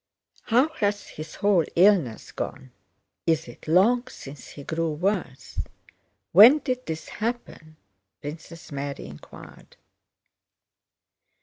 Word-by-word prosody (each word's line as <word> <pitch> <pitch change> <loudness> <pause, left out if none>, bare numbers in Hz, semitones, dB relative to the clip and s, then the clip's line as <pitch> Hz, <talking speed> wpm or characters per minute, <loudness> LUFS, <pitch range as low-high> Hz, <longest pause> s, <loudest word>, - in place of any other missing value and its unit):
"How 250 +6 +3
has 205 -1 -1
his 155 +1 -9
whole 200 -4 +3
illness 175 - +3
gone? 130 -2 -6 0.6
Is 160 0 +2
it - - -13
long 230 +10 +4
since 140 - -11
he 145 - -10
grew 160 +1 -1
worse? 175 -5 -2 0.7
When 225 - +9
did 255 -4 -3
this 160 0 -5
happen?" 210 -9 -5 0.4
Princess 160 +3 -9
Mary 140 0 -5
inquired. 70 +1 -13
165 Hz, 105 wpm, -25 LUFS, 150-210 Hz, 0.7 s, When